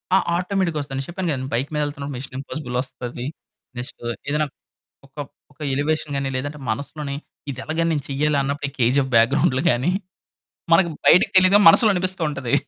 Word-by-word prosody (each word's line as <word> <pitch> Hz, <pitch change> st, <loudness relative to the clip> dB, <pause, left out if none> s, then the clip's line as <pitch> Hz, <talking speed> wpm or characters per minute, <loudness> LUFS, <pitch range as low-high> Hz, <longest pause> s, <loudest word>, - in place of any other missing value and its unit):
ఆ! -, -, +7 dB, 0.2 s
ఆటోమేటిక్‌గా 180 Hz, -3 st, 0 dB
వస్తదండి. 135 Hz, -1 st, -5 dB
నేను 135 Hz, -, -6 dB
చెప్పాను 180 Hz, 0 st, -3 dB
కదండీ 130 Hz, -2 st, -3 dB
బైక్ 130 Hz, +4 st, 0 dB
మీద 150 Hz, -, 0 dB
ఎళ్తున్నప్పుడు 140 Hz, -1 st, -5 dB
మిశన్ 130 Hz, 0 st, -8 dB
ఇంపాసిబుల్ 135 Hz, -2 st, -6 dB
వస్తది. 125 Hz, -2 st, -7 dB, 0.5 s
నెక్స్‌ట్ 125 Hz, +1 st, -6 dB, 0.3 s
ఏదైనా 150 Hz, +1 st, +1 dB, 0.6 s
ఒక, 135 Hz, -, -31 dB, 0.4 s
ఒక 145 Hz, -, -32 dB
ఎలివేషన్ 150 Hz, +1 st, -1 dB
గాని 140 Hz, -1 st, -1 dB
లేదంటే 145 Hz, +3 st, -4 dB
మనసులోని 140 Hz, +4 st, -4 dB, 0.4 s
ఇది 130 Hz, -, -7 dB
ఎలాగని 165 Hz, +1 st, 0 dB
నేను 145 Hz, -3 st, -2 dB
చెయ్యాలన్నప్పుడు 140 Hz, 0 st, 0 dB
ఈ -, -, -24 dB
కేజీఎఫ్ 130 Hz, +3 st, +2 dB
బ్యాక్ 115 Hz, +1 st, +6 dB
గ్రౌండ్లు 135 Hz, -2 st, +2 dB
గాని. 130 Hz, +7 st, +1 dB, 0.8 s
మనకు 170 Hz, +1 st, +5 dB, 0.2 s
బయటకి 180 Hz, -, +6 dB
తెలియదుగా 185 Hz, +2 st, +7 dB
మనసులో 215 Hz, +6 st, +7 dB
అనిపిస్తూ 185 Hz, 0 st, -1 dB
ఉంటది. 140 Hz, -5 st, -4 dB
145 Hz, 165 wpm, -22 LUFS, 135-160 Hz, 0.8 s, ఆ